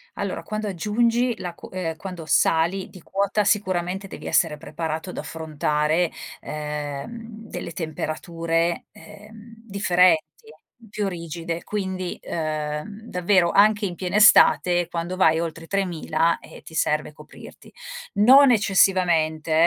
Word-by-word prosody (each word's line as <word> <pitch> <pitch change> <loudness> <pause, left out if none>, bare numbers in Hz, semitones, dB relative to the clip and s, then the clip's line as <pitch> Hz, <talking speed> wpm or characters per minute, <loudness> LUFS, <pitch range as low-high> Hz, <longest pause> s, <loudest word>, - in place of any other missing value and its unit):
Allora - - -4
quando 215 0 -4
aggiungi 230 +5 0
la 175 -2 -6
q - - -12
ehm, 170 -4 -4
quando 175 -1 -8
sali 165 +4 +2
di 185 - -13
quota 200 +4 0
sicuramente 190 -1 0
devi - - -9
essere 160 -3 +2
preparato 160 +2 -5
ad - - -8
affrontare, 155 +1 -1 0.3
ehm, 150 +10 -6
delle 170 - -6
temperature, 165 +1 -2
ehm, 220 +2 -14
differenti, 180 -4 +4 0.7
più 205 0 -2
rigide, 170 -1 -5
quindi, 190 -3 -4
uhm, 155 +5 -4
davvero 180 -4 +2
anche 210 +2 +4
in 180 -3 -2
piena 185 +3 -2
estate 180 -4 +6
quando 170 +1 -4
vai 160 -4 +3
oltre 165 0 -4
i - - -12
3.000 170 -4 0
eh, - - -14
ti - - -13
serve 150 -1 0
coprirti. 150 +1 -14 0.4
Non 260 +6 +7
eccessivamente 180 -7 +2
175 Hz, 125 wpm, -23 LUFS, 160-200 Hz, 0.7 s, Non